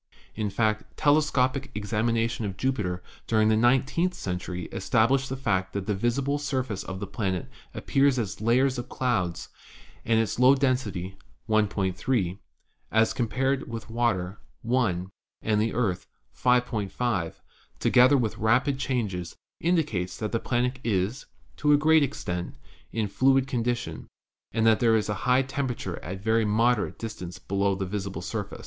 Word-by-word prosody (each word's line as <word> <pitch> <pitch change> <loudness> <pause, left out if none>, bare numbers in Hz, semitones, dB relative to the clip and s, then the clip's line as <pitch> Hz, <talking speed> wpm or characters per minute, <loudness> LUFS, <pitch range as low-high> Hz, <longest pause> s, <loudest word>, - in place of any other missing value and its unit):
In 105 -1 -2
fact, 110 +1 -1
telescopic 140 -2 +2
examination 115 +2 0
of 100 -2 -4
Jupiter 100 -9 -1 0.2
during 110 -1 +3
the 110 - +4
nine 120 +4 +4
teenth 175 +6 -1
century 90 - -4
established 120 +7 +2
the 135 - -3
fact 95 -8 -1
that 100 -1 -3
the 105 - 0
visible 130 +7 0
surface 130 -8 -2
of 95 0 -6
the 100 - -3
planet 95 -2 -2 0.3
appears 135 -1 +2
as 110 -3 -3
layers 125 +3 +2
of 120 +1 -6
clouds, 100 -10 -1 0.5
and 115 0 +2
its 115 0 -1
low 130 +2 +7
den 135 -1 +3
sity, 95 -6 -6 0.3
1.3, 100 -1 0 0.5
as 110 0 +3
compared 130 +2 -1
with 115 -1 -7
water, 105 -5 0 0.2
1, 105 -7 0 0.3
and 105 -1 +2
the 110 +1 -1
Earth, 100 -7 -1 0.3
5.5, 120 -6 0 0.4
together 130 +3 +5
with 115 -5 0
the - - -15
rapid 125 +5 +2
changes, 105 -11 -2 0.2
indicates 145 - 0
that 110 -1 -3
the 115 - 0
planet 125 +2 -1
is, 105 +4 -1 0.3
to 150 0 +3
a - - +6
great 160 +1 +5
extent, 90 -11 -3 0.4
in 115 -2 -1
a - - -3
fluid 135 +5 +3
condition, 120 - -2 0.4
and 110 0 +1
that 110 -1 +5
there 115 -2 +4
is 105 -1 0
a - - +1 0.2
high 130 +2 +5
temperature 130 -9 -3
at 90 +4 -5
a - - -9
very 110 +2 +2
moderate 110 +2 +1
distance 105 -6 -6
below 100 0 0
the 95 0 -3
visible 100 0 -4
surface. - - -5
115 Hz, 155 wpm, -27 LUFS, 100-130 Hz, 0.5 s, low